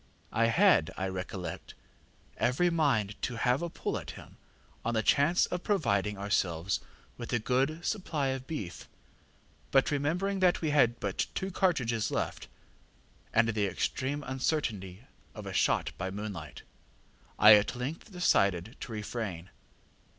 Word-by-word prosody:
I 115 - +2
had, 115 - +4
I 95 - -1
recollect, 95 0 -6 0.6
every 170 +9 +2
mind 130 -11 +1
to 125 - -2
have 125 +4 +1
a 170 - -2
pull - - -3
at - - -10
him - - -13 0.5
on 115 0 -1
the 110 - +1
chance 145 - +4
of 180 - -4
providing 105 - 0
ourselves 95 -3 0 0.4
with 120 - -6
a - - +4
good 135 +8 0
supply 155 -9 -1
of 130 0 -4
beef; 105 - -6 0.8
but 135 +1 +3
remembering 175 +8 0
that 180 -1 +3
we 155 -2 -1
had 120 -5 +3
but 100 -1 -1
two 190 0 -2
cartridges 125 - +1
left, - - -3 0.8
and 115 +1 +3
the 105 -2 +1
extreme 140 +9 -2
uncertainty 120 - -2 0.3
of - - -8
a - - -5
shot - - +2
by 95 0 -2
moonlight, 95 -7 -6 0.7
I 105 +1 +9
at 105 +4 +4
length 140 - -5
decided 100 - +1
to - - -7
refrain. 105 -5 -5
120 Hz, 145 wpm, -30 LUFS, 100-150 Hz, 0.8 s, I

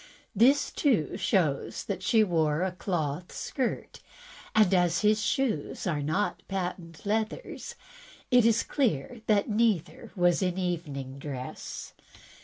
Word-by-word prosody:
This, 260 +8 +4
too, 230 - +1
shows 185 -7 0
that 200 - -4
she 220 -2 +4
wore 160 -4 +1
a 190 - 0
cloth 175 -3 -3
skirt, 255 -3 -3 0.6
and 210 -3 +5
as 175 -1 +3
his 215 0 +3
shoes 230 - -1
are 155 -5 0
not 155 +8 -1
patent 180 -3 -5
leathers, 220 - -3 0.6
it 245 -1 +6
is 230 0 +3
clear 240 - -1
that 205 -2 +3
neither 215 -6 0
was 175 -1 +3
in 180 -1 0
evening 150 -7 -3
dress." 135 -3 -6
185 Hz, 125 wpm, -28 LUFS, 160-215 Hz, 0.6 s, it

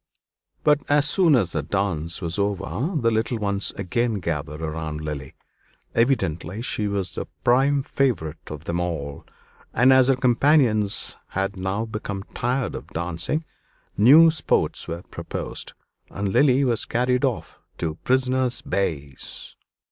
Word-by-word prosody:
But 150 -1 +4
as 145 0 +4
soon 165 -2 +4
as 95 -9 +1
the 75 - -1
dance 85 0 -1
was 85 +3 -2
over, 100 - -1
the 115 -2 +2
little 115 +2 0
ones 100 -2 -1
again 115 +4 -1
gathered 75 -5 -3
round 80 -1 -4
Lily. 75 -3 -6 0.6
Evidently 100 - 0
she 105 -4 -1
was 100 -3 -2
the - - -4 0.2
prime 135 +3 +3
favorite 80 - -1
of 75 0 -7
them 85 +1 -2
all; 75 -5 -4 0.5
and 125 +3 +6
as 130 -1 +5
her 135 - +4
companions 125 -4 +2
had 95 +1 -2
now 95 +4 -2
become 105 -3 -5
tired 125 +2 -1
of - - -7
dancing, 90 - -2 0.5
new 150 +10 +8
sports 155 - 0
were 85 +2 -5
proposed, - - -5 0.4
and 100 0 -3
Lily 135 +5 +4
was 120 -4 +1
carried 125 +2 +1
off 130 -5 -2 0.2
to 80 -2 -2
"Prisoner's 130 -1 +1
Base." 75 -8 -3
105 Hz, 140 wpm, -24 LUFS, 85-130 Hz, 0.6 s, new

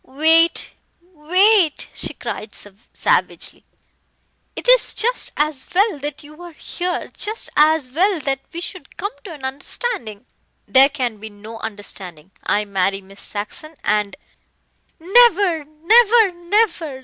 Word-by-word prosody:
"Wait 320 +5 +3 0.4
wait," 365 +2 +3
she - - -4
cried 215 -1 -6
savagely, 205 +1 -2 0.9
"it - - -6
is - - +5
just 485 +3 0
as 300 -3 0
well 400 -5 +2
that 290 +1 -5
you 305 +3 -14
are 350 -1 -10
here 355 +3 -4
just 435 +2 -4
as 305 -3 +3
well 365 +5 +1
that 275 -2 -2
we 335 - -6
should 350 -4 -8
come 405 +3 -3
to 390 - -9
an 290 -5 -8
understanding." 265 - -4 0.4
"There 270 +1 +6
can 250 -6 -3
be 220 +1 -9
no 215 +2 -11
understanding. 195 -6 -8
I 210 +1 0
marry 195 0 -1
Miss 195 +1 -12
Saxon 310 +11 -6
and 210 -1 0 0.5
" - - -44
"Never, 375 -4 +4
never, 425 +8 +4
never! 345 -5 -1
305 Hz, 135 wpm, -20 LUFS, 225-365 Hz, 0.9 s, There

